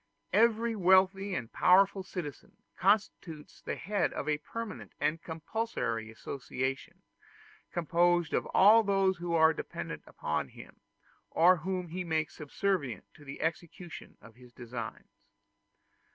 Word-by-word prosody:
Every 230 Hz, +2 st, +3 dB
wealthy 190 Hz, 0 st, +3 dB
and 115 Hz, -3 st, -5 dB
powerful 195 Hz, +2 st, +4 dB
citizen 180 Hz, -6 st, -7 dB, 0.2 s
constitutes 190 Hz, -6 st, -1 dB
the -, -, -4 dB
head 200 Hz, +1 st, -1 dB
of 145 Hz, -, -4 dB
a 150 Hz, -1 st, +1 dB
permanent 230 Hz, +6 st, -7 dB
and 160 Hz, +2 st, 0 dB
compulsory 160 Hz, -, -3 dB
association, 130 Hz, +3 st, -5 dB, 0.7 s
composed 175 Hz, 0 st, +2 dB
of -, -, 0 dB
all 215 Hz, +4 st, +7 dB
those 195 Hz, -3 st, +2 dB
who 170 Hz, -1 st, -2 dB
are 160 Hz, 0 st, +6 dB
dependent -, -, -6 dB
upon -, -, -2 dB
him, -, -, -14 dB, 0.5 s
or 180 Hz, +3 st, +5 dB
whom 180 Hz, +1 st, -3 dB
he 180 Hz, +3 st, -4 dB
makes 160 Hz, -2 st, -1 dB
subservient 150 Hz, -, -2 dB
to 150 Hz, -, -16 dB
the 135 Hz, -1 st, -8 dB
execution 165 Hz, +1 st, -5 dB
of 115 Hz, -, -15 dB
his 125 Hz, +1 st, -17 dB
designs. 120 Hz, -2 st, -8 dB
175 Hz, 125 wpm, -31 LUFS, 150-195 Hz, 0.7 s, all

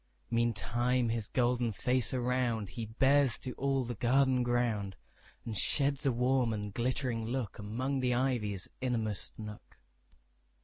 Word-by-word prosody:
Meantime 120 Hz, +1 st, +1 dB
his 115 Hz, -2 st, -1 dB
golden 120 Hz, -2 st, +1 dB
face 125 Hz, +5 st, 0 dB
aroundHe 120 Hz, -5 st, -1 dB
bears 135 Hz, -3 st, +4 dB
to 125 Hz, -, -6 dB
all 135 Hz, -1 st, 0 dB
the 120 Hz, -, -3 dB
garden 130 Hz, +3 st, +3 dB
ground, 120 Hz, -5 st, 0 dB, 0.5 s
And 115 Hz, -, -4 dB
sheds 140 Hz, +9 st, +1 dB
a -, -, +4 dB
warm 125 Hz, -1 st, +2 dB
and 105 Hz, -1 st, -4 dB
glittering 120 Hz, -1 st, -1 dB
lookAmong 125 Hz, +2 st, -2 dB
the 125 Hz, -1 st, +2 dB
ivy's 115 Hz, -7 st, -1 dB
inmost 115 Hz, -5 st, -2 dB
nook. 105 Hz, -1 st, -9 dB
120 Hz, 125 wpm, -32 LUFS, 110-130 Hz, 0.5 s, bears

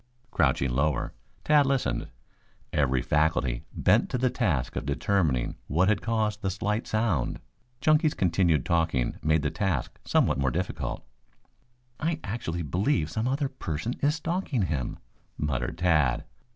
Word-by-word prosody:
Crouching 65 Hz, -3 st, +2 dB
lower, 70 Hz, +2 st, 0 dB, 0.3 s
Tad 150 Hz, -2 st, +4 dB
listened, 130 Hz, -, 0 dB, 0.7 s
every 65 Hz, -4 st, +2 dB
faculty 75 Hz, -6 st, +1 dB
bent -, -, +3 dB
to -, -, -1 dB
the 125 Hz, 0 st, +1 dB
task 95 Hz, -, 0 dB
of -, -, -2 dB
determining 70 Hz, -3 st, 0 dB
what 90 Hz, +7 st, +2 dB
had 110 Hz, -, +2 dB
caused 110 Hz, -2 st, 0 dB
the 95 Hz, -, 0 dB
slight 105 Hz, +4 st, -2 dB
sound. 110 Hz, -7 st, 0 dB, 0.4 s
Chunky's 155 Hz, 0 st, +3 dB
continued 85 Hz, -5 st, +2 dB
talking 80 Hz, -7 st, 0 dB
made 80 Hz, 0 st, +2 dB
the 75 Hz, -, 0 dB
task 95 Hz, -, -2 dB
somewhat -, -, +2 dB
more 65 Hz, -1 st, +2 dB
difficult. 60 Hz, -, -3 dB, 0.9 s
"I 160 Hz, 0 st, -1 dB
actually 95 Hz, -6 st, -3 dB
believe 80 Hz, -, 0 dB
some 110 Hz, +7 st, -1 dB
other 140 Hz, +2 st, 0 dB
person 110 Hz, -, -4 dB
is 145 Hz, +2 st, +3 dB
stalking 165 Hz, -, -1 dB
him," 75 Hz, -8 st, -2 dB, 0.4 s
muttered 65 Hz, -1 st, -2 dB
Tad. 75 Hz, -8 st, +2 dB
85 Hz, 140 wpm, -27 LUFS, 70-115 Hz, 0.9 s, Tad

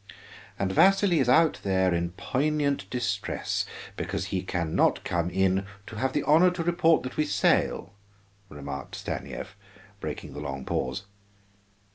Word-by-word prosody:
"And 95 Hz, -1 st, -1 dB
Vasili 190 Hz, -, +4 dB
is 130 Hz, -3 st, +2 dB
out 160 Hz, +4 st, +4 dB
there 95 Hz, -2 st, +2 dB
in 85 Hz, 0 st, -1 dB
poignant 140 Hz, +5 st, -1 dB
distress 115 Hz, -5 st, -2 dB, 0.3 s
because -, -, -3 dB
he 95 Hz, -, +1 dB
can 85 Hz, -3 st, -3 dB
not -, -, +2 dB
come 85 Hz, 0 st, -1 dB
in 95 Hz, +1 st, +1 dB, 0.2 s
'to 110 Hz, -, -9 dB
have 130 Hz, +3 st, 0 dB
the 145 Hz, -, 0 dB
honor 165 Hz, +5 st, +6 dB
to 180 Hz, -1 st, -3 dB
report 170 Hz, -1 st, +3 dB
that 130 Hz, -, -6 dB
we 155 Hz, -, +2 dB
sail,'" 125 Hz, -, +1 dB, 0.6 s
remarked 70 Hz, -1 st, -7 dB
Stanief, 95 Hz, -, -6 dB, 0.4 s
breaking -, -, -6 dB
the -, -, -7 dB
long 65 Hz, 0 st, -5 dB
pause. 65 Hz, +6 st, -2 dB
100 Hz, 145 wpm, -27 LUFS, -, 0.6 s, honor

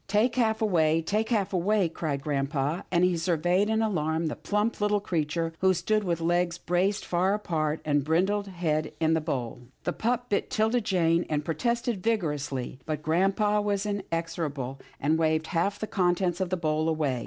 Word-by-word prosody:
" -, -, -41 dB
Take 230 Hz, +3 st, +3 dB
half 220 Hz, -3 st, +1 dB
away 165 Hz, -6 st, +3 dB
— -, -, -15 dB
take 215 Hz, +4 st, 0 dB
half 205 Hz, -5 st, 0 dB
away," 190 Hz, +1 st, +2 dB
cried 150 Hz, -4 st, -3 dB
grampa, 140 Hz, +2 st, -1 dB
and 175 Hz, -, +3 dB
he 180 Hz, -1 st, +3 dB
surveyed 175 Hz, +4 st, +1 dB
in 220 Hz, 0 st, +2 dB
alarm 160 Hz, -5 st, 0 dB
the 155 Hz, -, -2 dB
plump, 210 Hz, +2 st, -1 dB
little 210 Hz, 0 st, +2 dB
creature, 165 Hz, -3 st, -1 dB
who 190 Hz, 0 st, +3 dB
stood 215 Hz, +5 st, +1 dB
with 170 Hz, -3 st, -1 dB
legs 175 Hz, +1 st, +1 dB
braced 180 Hz, +4 st, 0 dB
far 185 Hz, +3 st, +1 dB
apart 160 Hz, -6 st, -1 dB
and 145 Hz, -1 st, +2 dB
his 140 Hz, -, -4 dB
brindled 190 Hz, +6 st, +1 dB
head 165 Hz, -5 st, -1 dB
in 160 Hz, 0 st, +2 dB
the 160 Hz, -, +1 dB
bowl. 125 Hz, -5 st, -4 dB, 0.2 s
The -, -, -1 dB
pup 245 Hz, +2 st, -1 dB
bit 200 Hz, -, 0 dB
'Tilda 220 Hz, +3 st, +1 dB
Jane, 170 Hz, -4 st, +1 dB
and 150 Hz, -1 st, -1 dB
protested 235 Hz, -, -1 dB
vigor 210 Hz, -8 st, +1 dB
ously, 135 Hz, -3 st, -5 dB
but 155 Hz, -1 st, -3 dB
grampa 195 Hz, +6 st, +2 dB
was 205 Hz, -1 st, -1 dB
inexorable, 165 Hz, -9 st, -3 dB, 0.2 s
and 155 Hz, +3 st, +1 dB
waved 160 Hz, -1 st, +2 dB
half 195 Hz, +4 st, 0 dB
the 215 Hz, -, -3 dB
contents 180 Hz, -2 st, 0 dB
of 185 Hz, -, 0 dB
the 185 Hz, -, 0 dB
bowl 155 Hz, -1 st, 0 dB
away. 150 Hz, -6 st, 0 dB
175 Hz, 190 wpm, -27 LUFS, 155-205 Hz, 0.2 s, Take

